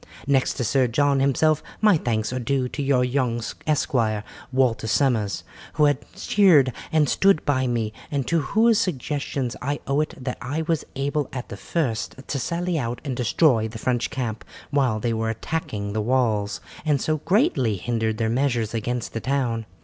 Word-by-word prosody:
Next 135 -1 +2
to 125 - -2
Sir 130 +3 +2
John 140 +3 +2
himself, 145 +3 +3 0.2
my 210 -3 +5
thanks 115 -5 -1
are 130 - -1
due 130 +1 0
to 145 - -4
your 135 -2 +2
young 125 -2 0 0.3
esquire, 115 -8 +1 0.3
Walter 130 -4 +1
Somers, 110 -4 +1 0.3
who 150 - +3
has 145 0 +4 0.2
cheered 160 -11 +4 0.2
and 155 -2 +3
stood 195 0 +3
by 130 -3 +1
me, 115 -3 -1 0.2
and 140 -3 -1
to 165 -1 +1
whose 220 +9 +3
suggestions 140 -5 -2
I 145 +2 -2
owe 140 +2 +1
it 155 +3 -3
that 125 -1 -4
I 145 +6 -2
was 160 -1 -1
able 140 +1 -1
at 125 -1 -6
the - - -6
first 130 -10 -2
to 140 - -2
sally 170 +5 -1
out 120 -2 -3
and 135 -3 -2
destroy 120 -1 +3
the 110 +1 -8
French 120 +1 0
camp 115 -4 -4 0.3
while 130 -7 +2
they 115 +1 -1
were 110 0 -1
attacking 105 -5 -3
the 110 - 0
walls, 110 -4 0 0.2
and 150 -3 +2
so 155 +3 0
greatly 180 - +2
hindered 110 +1 -1
their 110 0 0
measures 120 -2 0
against 115 -4 -3
the 115 - -3
town. 120 -4 -1
130 Hz, 180 wpm, -24 LUFS, 115-145 Hz, 0.3 s, my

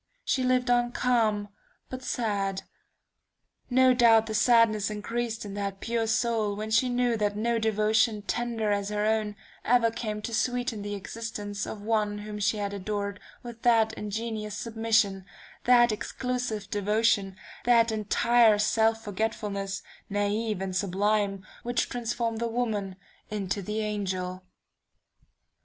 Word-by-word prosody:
She 260 - +1
lived 255 0 +2
on 240 0 +2
calm, 220 -5 +1 0.4
but 255 0 -7
sad. 200 -6 -1 1.1
No 260 0 +5
doubt 230 -3 +5
the 220 - -5
sadness 220 -2 +4
increased 225 +2 -3
in 200 - -6
that 200 -1 -4
pure 230 +1 -1
soul 220 -2 +1
when 215 +1 -5
she 250 +3 +3
knew 245 -1 +1
that 205 -1 0
no 230 +2 +1
devotion 220 0 +2
tender 230 -1 -1
as 200 0 0
her 210 0 -1
own, 215 -1 0 0.3
ever 230 -1 +3
came 215 -2 -4
to 230 - -4
sweeten 245 -1 -1
the 205 0 -4
existence 205 0 -5
of 205 -2 -7
one 210 -1 0
whom 210 0 -6
she 210 +1 +1
had 200 -1 -3
adored 200 0 -3 0.2
with 235 -1 -9
that 225 -2 +4
ingenuous 210 0 -4
submission, 220 -4 +1 0.4
that 240 -1 +6
exclusive 225 0 -3
devotion, 205 -1 +1 0.3
that 235 -1 +5
entire 220 +1 +4
self 225 +1 +2
forgetfulness, 200 -2 -3 0.3
naive 205 0 -1
and 190 -1 -4
sublime, 200 0 0 0.2
which 240 0 -1
transform 235 -1 -2
the 235 +1 -1
woman 220 -5 -2 0.3
into 200 -2 -2
the 210 +3 -3
angel. 185 -3 -3
215 Hz, 135 wpm, -28 LUFS, 205-235 Hz, 1.1 s, that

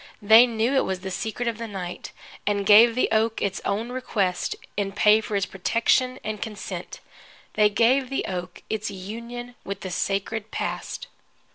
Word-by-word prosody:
They 220 +4 +7
knew 230 +2 0
it 270 - +3
was 190 -1 -3
the 190 0 -5
secret 225 +4 -3
of 230 -1 -2
the 230 - -4
night, 185 -4 -6 0.4
and 200 -1 +1
gave 225 +3 +7
the 255 - +2
oak 220 0 +2
its 195 -1 -2
own 220 +5 -2
request, 200 -8 -1 0.2
in 195 -1 -2
pay 210 +2 +5
for 210 -1 -4
its 200 - +1
protection 235 +6 +1
and 215 -1 -4
consent. 215 -3 -6 0.5
They 210 -1 +4
gave 250 +5 +3
the 270 - -2
oak 180 -1 -6
its 215 -1 -2
union 235 +5 -7
with 200 0 -6
the 185 - -5
sacred 200 +4 -2
Past. - - -4
215 Hz, 170 wpm, -25 LUFS, 195-235 Hz, 0.5 s, They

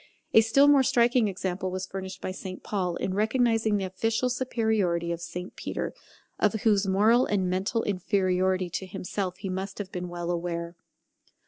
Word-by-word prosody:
A 220 - +8
still 250 +6 +4
more 285 -1 +6
striking 240 -2 +3
example 190 -1 -3
was 185 +1 -3
furnished 190 0 -7
by - - -3
St 185 0 -7
Paul 180 -4 -1
in 185 - -2
recognizing 220 0 +2
the 195 - -2
official 225 +6 0
superiority 220 -9 0
of 170 0 -4
St 180 +2 -6
Peter, - - -4 0.5
of 210 - +3
whose 205 -3 +3
moral 220 +6 +4
and 195 -3 +1
mental 195 +5 0
inferiority 185 -2 0
to 190 - -4
himself 185 0 -4
he - - -6
must 190 +1 -4
have 195 -2 -6
been 180 0 -4
well 175 0 -3
aware. 170 0 -3
190 Hz, 165 wpm, -27 LUFS, 180-220 Hz, 0.5 s, A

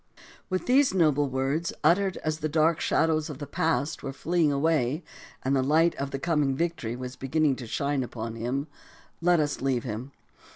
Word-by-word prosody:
With 185 -1 -1
these 260 -4 +4
noble 150 -5 +3
words, 135 +6 -1
uttered 185 +4 +3
as 155 0 -1
the 155 0 -2
dark 160 +1 +2
shadows 155 -1 +1
of 145 - -6
the 145 - -6
past 160 +1 -1
were 135 - -4
fleeing 165 +2 +1
away 145 0 +1 0.4
and 135 +1 +2
the 135 - +3
light 160 +5 +3
of 140 0 -3
the 135 - -3
coming 145 -3 +1
victory 165 -7 -2
was 125 0 -6
beginning 145 +1 +1
to 125 - -7
shine 140 +3 -1
upon 115 -2 -5
him, 125 +5 -2 0.6
let 175 0 +4
us 145 -1 -1
leave 130 -3 0
him. 120 +3 -5
145 Hz, 180 wpm, -27 LUFS, 135-165 Hz, 0.6 s, these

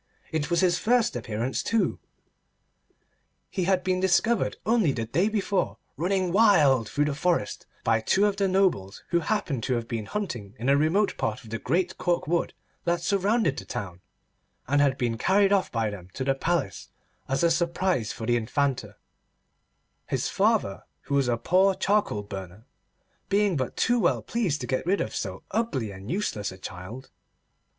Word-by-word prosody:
It 155 -2 -1
was 170 0 +2
his 175 -2 +3
first 240 - +2
appearance, 115 +2 -2
too. 230 -1 0 1.5
He 185 -3 -1
had 185 -1 +2
been 185 0 +1
discovered 190 +5 +2
only 215 - +3
the 115 -3 -3
day 170 - +1
before, 200 -3 -1 0.2
running 185 +2 0
wild 155 - +4
through 145 +1 +1
the 150 - -1
forest, 170 +4 -1 0.2
by 115 -1 +2
two 195 - +3
of 205 -1 +1
the 195 -1 +2
nobles 185 - +1
who 170 0 +2
happened 165 - -1
to 130 - +1
have 115 -1 -3
been 115 -3 -4
hunting 120 - -4
in 125 +4 -1
a 140 - +6
remote 165 +8 +2
part 110 - -2
of 110 - -13
the 115 - -3
great 170 +11 -1
cork 175 -1 0
wood 170 +1 0 0.3
that 170 0 0
surrounded 200 - +1
the - - -10
town, 90 -3 -6 0.7
and 145 +3 +3
had 135 -2 +2
been 120 -3 -1
carried 195 - +3
off 195 -1 +1
by 115 -2 0
them 90 -3 -9
to 130 - -2
the 135 +1 +2
Palace 150 - -2 0.4
as 135 +4 0
a 170 - +4
surprise 170 - 0
for 110 - -6
the 120 +1 +2
Infanta; 135 +4 -1 1.1
his - - -1
father, - - +1 0.2
who - - -6
was 140 -2 +3
a 120 -1 +1
poor 190 +8 +3
charcoal 200 - +1
burner, 95 +1 -8 0.6
being 200 -2 +2
but 130 -3 -3
too 245 0 +2
well - - +1
pleased 190 - -1
to - - -3
get 130 +1 -1
rid 195 +2 +2
of 110 - -3
so 95 -1 -4
ugly 190 - -1
and 95 +2 -10
useless 155 - -2
a 95 - -11
child. 95 +8 -9
155 Hz, 175 wpm, -26 LUFS, 115-190 Hz, 1.5 s, a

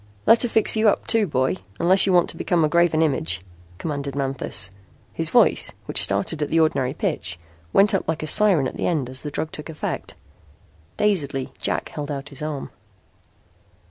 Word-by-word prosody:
"Let 230 - +6
her 245 - 0
fix 220 0 +3
you 220 0 +4
up - - -1
too, 225 -3 +2
boy, 130 - 0 0.2
unless 185 +3 +3
you - - +3
want 175 -1 +4
to - - -15
become 170 -3 +1
a - - +2
graven 165 0 +3
image," 90 - -1 0.4
commanded 140 - -4
Manthis. 135 -7 -1 0.4
His - - -2
voice, - - +3
which - - 0
started 100 +11 0
at 150 - -1
the 165 - +2
ordinary 145 -4 +1
pitch, 85 -8 -2 0.3
went 200 - +4
up 195 - -1
like 160 -1 -2
a - - -2
siren 175 -5 +5
at - - -8
the - - -1
end 145 -8 -1
as 130 - -3
the 150 - -5
drug 155 +2 -4
took 150 - -8
effect. 155 - -5 0.8
Dazedly 145 -11 -1
Jack - - -1
held 150 -1 -6
out 140 -1 -5
his 140 -1 -7
arm. 150 -2 -5
150 Hz, 190 wpm, -22 LUFS, 135-175 Hz, 0.8 s, Let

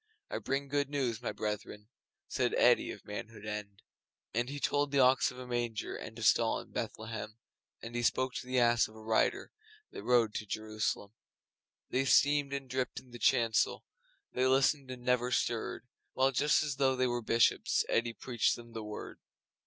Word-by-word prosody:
I - - -2
bring 140 +1 -2
good 145 0 0
news, 130 -6 -1
my - - -2
brethren!' 105 0 -5 0.4
Said - - 0
Eddi, - - +4
of - - -8
Manhood 110 0 -7
End. 105 -2 -6 0.5
And 120 +3 0
he 145 +1 -5
told 145 +1 +1
the 140 - -1
Ox 130 0 +5
of 125 - -11
a 125 - -7
manger 120 -3 -2
And 110 - -8
a 115 - -6
stall 115 0 +3
in - - -12
Bethlehem, 110 -1 -5 0.5
And 115 - -7
he 120 - -1
spoke 130 +2 +1
to - - -6
the 130 0 -1
Ass 120 -1 +4
of 110 - -17
a 110 - -12
Rider 110 0 +1 0.4
That - - -7
rode 120 -3 +3
to 105 - -4
jerusalem. 110 -1 -3 0.8
They 135 +1 +1
steamed 145 +1 +4
and 140 -1 -4
dripped 130 0 -2
in 125 -1 -19
the 120 - -9
chancel, 115 -2 +2 0.5
They 130 +1 +2
listened 135 +1 +2
and 125 -1 -7
never 125 0 +2
stirred, 120 +1 -1 0.3
While, 135 +1 +3
just 145 +4 +3
as 145 -3 -3
though 135 -1 +3
they 130 0 +1
were 120 -1 -1
Bishops, 115 +1 +2
Eddi 115 0 +1
preached 120 -1 0
them 120 -1 -12
The 110 -1 -5
Word. 105 0 -7
120 Hz, 185 wpm, -32 LUFS, 110-130 Hz, 0.8 s, Ox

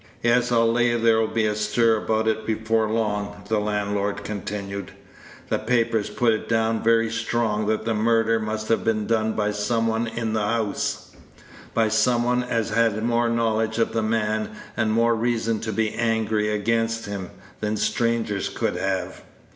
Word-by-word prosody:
"Yes; 120 +1 +3
I'll 115 -1 +4
lay 120 0 +2
there'll 115 -1 +3
be 110 0 0
a 105 - +1
stir 110 +2 +2
about 110 +1 0
it 110 0 0
before 110 0 0
long," 105 -2 -2
the 110 -1 +2
landlord 105 -1 -1
continued. 100 -1 -5 0.6
"The - - +1
papers 115 -2 +1
put 120 -2 +2
it 110 - -4
down 115 0 +1
very 115 0 +3
strong 115 -2 -1
that 110 0 0
the 115 - +1
murder 115 +1 +2
must 110 0 -3
have 115 - +2
been 110 -2 0
done 110 -1 +1
by 105 -1 0
some 105 +2 0
one 115 +1 0
in 115 -1 -3
the 110 - 0
house 105 0 -2 0.6
by 115 -1 +3
some 120 +2 +2
one 125 +1 +1
as 115 -3 -1
had 110 -1 +2
more 120 0 +1
knowledge 110 -1 0
of 115 - +1
the 115 - +1
man, 110 -1 0 0.3
and 110 -2 +1
more 115 +1 +3
reason 115 -1 0
to 110 - -4
be 110 0 0
angry 110 -2 0
against 115 +2 0
him, 100 -3 -5 0.3
than 105 0 -1
strangers 105 -2 0
could - - -2
have. 95 0 -2
110 Hz, 170 wpm, -24 LUFS, 105-115 Hz, 0.6 s, I'll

